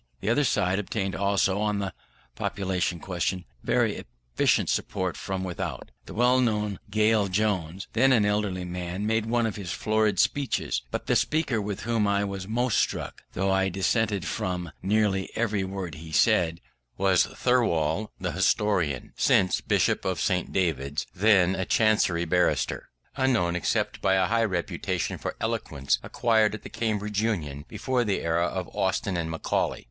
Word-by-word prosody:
The 100 - -2
other 145 +5 +3
side 95 -6 +1
obtained 95 -1 -2
also, 100 +1 +1
on 105 -1 0
the 95 -3 -3 0.4
population 95 -3 -1
question, 90 0 -2 0.2
very - - +1 0.3
efficient - - +3
support 95 -1 -1
from 95 -1 -4
without. 90 -8 -5 0.2
The - - -9
well 125 +3 +4
known 105 -4 0
Gale 105 0 +3
Jones, 95 -3 -1
then 130 +4 +4
an 115 -5 +4
elderly 105 -3 0
man, 90 +2 -4
made 110 0 +1
one 120 0 +1
of 110 -2 -3
his 95 -4 -5
florid 110 -1 +1
speeches; 135 - 0
but - - -4
the - - +1
speaker 150 -8 +1
with 100 -1 -4
whom 115 -2 +1
I 100 0 +2
was 100 -1 -4
most 120 +1 +1
struck, - - -2
though 95 +1 0
I 95 0 +2
dissented 100 +1 0
from 90 -3 -3
nearly 100 -1 +1
every 105 -4 0
word 95 -3 -5
he 80 +2 -9
said, 85 +2 +3 0.4
was 95 -2 +3
Thirlwall, 105 -6 +1
the 90 -1 -2
historian, 95 -7 +1
since 95 - +3
Bishop - - +1
of 95 -2 -1
St. 90 -3 0
David's, 75 -5 -1
then 95 -2 +4
a 95 - -1
Chancery 95 -5 +2
barrister, 90 +2 0 0.3
unknown 120 -11 +1
except 90 - -1
by 95 - +3
a 95 -1 +3
high 115 +3 +2
reputation 90 -5 -2
for - - -4
eloquence 70 -1 -1
acquired 110 -2 +2
at 105 - -10
the - - -8
Cambridge 105 -2 -1
Union 75 -10 -2
before 125 +3 -1
the 105 -4 -1
era 85 +1 +1
of 95 -2 -4
Austin 95 0 0
and 85 -2 -2
Macaulay. 80 0 -1
95 Hz, 160 wpm, -26 LUFS, 90-110 Hz, 0.4 s, well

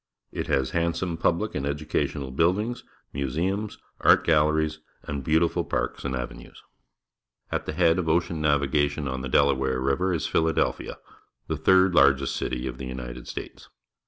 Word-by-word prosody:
It - - -4
has 65 -1 +1
handsome 85 +1 -1
public 85 +6 0
and 65 - -3
educational 70 -2 -2
buildings, 95 - 0 0.3
museums, 85 +10 -2 0.2
art - - +5
galleries, 75 0 +2 0.2
and 70 -2 -5
beautiful 80 +4 +2
parks - - -3
and 65 -1 -2
avenues. 60 -1 -8 0.9
At - - -2
the - - -2
head 85 +1 +3
of 80 -3 -1
ocean 85 -1 0
navigation 75 0 +1
on 65 0 -3
the 65 - -5
Delaware 65 -1 +2
River 70 +9 +1
is 85 -3 -1
Philadelphia, 80 0 0 0.5
the - - -2
third 95 -1 +4 0.3
city 65 0 -3
of 65 -1 -5
the 65 - -5
United 60 -1 -7
States. - - -8
75 Hz, 145 wpm, -26 LUFS, 65-85 Hz, 0.9 s, art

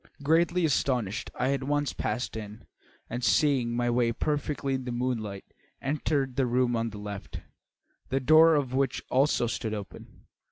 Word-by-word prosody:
Greatly 170 +3 +3
astonished, 125 -7 0
I 130 +2 +1
at 140 - -2
once 145 +1 0
passed 110 +3 -3
in, 105 -1 -8 0.4
and, 120 +2 -5
seeing 130 -6 +2
my 120 0 0
way 120 -1 +2
perfectly 145 +1 -2
in 130 -1 -3
the 125 - -3
moonlight, 115 -5 -3 0.3
entered 140 -2 -1
the 135 -2 +2
room 125 0 +1
on 115 0 -1
the 105 - -9
left, 105 -1 -7 0.7
the 135 - +1
door 155 +4 +6
of 135 -4 -1
which 135 -1 0
also 135 -1 +3
stood 110 -2 -3
open. 100 -4 -10
130 Hz, 160 wpm, -28 LUFS, 115-140 Hz, 0.7 s, door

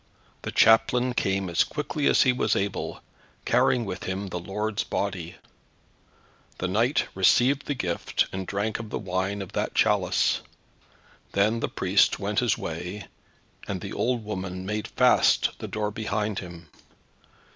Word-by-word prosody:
The - - -5
chaplain 125 +3 +4
came 95 -4 0
as 85 -1 +3
quickly 150 0 -2
as - - +5
he 125 - +3
was 125 - +1
able, 100 0 -3 0.4
carrying 120 -2 +3
with 95 -2 -5
him 95 +1 -3
the 90 - -4
Lord's 105 +4 -2
Body. 90 -4 -3 1.2
The 90 - -2
knight 115 +9 +2
received 125 +9 +3
the 145 - -1
Gift, 90 -8 -1
and 95 -1 -4
drank 105 +3 -2
of 115 -2 -7
the - - -3
Wine 95 +1 -2
of 95 - -11
that - - -2
chalice; - - +2 0.9
then 105 +4 +2
the - - -2
priest - - +2
went - - -1
his - - +1
way, 95 +2 -5 0.6
and 95 -2 -3
the 100 - -7
old 120 -1 0
woman 95 -3 -5
made 105 +2 -3
fast - - +4
the - - -5
door 105 -1 -2
behind 105 -1 -2
him. 85 -3 -10
100 Hz, 150 wpm, -26 LUFS, 95-110 Hz, 1.2 s, as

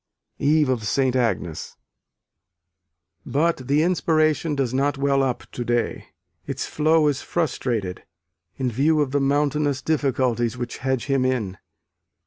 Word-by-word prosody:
Eve 150 +1 +3
of 125 -4 0
St. 130 +1 +1
Agnes. 100 -10 -2 1.5
But 150 -3 0
the 145 +3 +3
inspiration 155 -3 +1
does 130 -3 -1
not 140 +2 +1
well 140 0 +2
up 125 -3 -1
to 120 - -4
day: 120 0 -1 0.4
its - - -3
flow 155 0 +2
is 145 -2 0
frustrated, 120 - -2 0.5
in 130 -2 -1
view 150 +7 +2
of 140 -3 -1
the 145 0 +1
mountainous 145 0 +1
difficulties 125 -6 0
which 120 -1 -5
hedge 130 -2 -1
him 135 -2 +1
in. 115 -8 -1
135 Hz, 130 wpm, -23 LUFS, 125-150 Hz, 1.5 s, Eve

